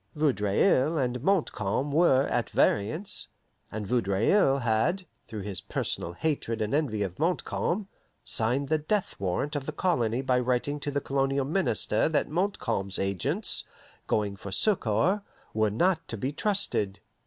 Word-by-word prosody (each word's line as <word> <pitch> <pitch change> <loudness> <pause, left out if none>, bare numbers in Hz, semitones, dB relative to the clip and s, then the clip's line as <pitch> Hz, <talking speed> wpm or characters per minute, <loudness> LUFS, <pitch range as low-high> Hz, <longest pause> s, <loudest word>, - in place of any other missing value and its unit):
Vaudreuil 145 - +2
and 125 -3 -1
Montcalm 140 - 0
were 140 -4 +4
at 120 -4 -1
variance, 150 - 0 0.4
and 110 -1 -4
Vaudreuil 120 - +2
had, 115 - +1 0.2
through 110 -2 -6
his 95 -2 -4
personal 85 - -3
hatred 115 - -2
and 105 +2 -1
envy 130 -9 +1
of 95 +2 -5
Montcalm, 180 +3 -1 0.4
signed 125 +5 -1
the 155 0 +2
death 195 +6 -1
warrant 95 +11 -1
of 140 -2 -3
the - - -1
colony 130 -8 0
by 130 -1 +2
writing 125 +4 0
to 145 - -3
the 140 0 -1
colonial 135 0 0
minister 145 - +1
that 155 - 0
Montcalm's 165 - -1
agents, 95 -2 0 0.4
going 105 -2 0
for 100 0 -8
succour, 180 - +2 0.3
were 110 -1 +2
not 165 - +1
to 115 - -4
be 130 +6 -2
trusted. 150 - 0
130 Hz, 145 wpm, -28 LUFS, 105-155 Hz, 0.4 s, were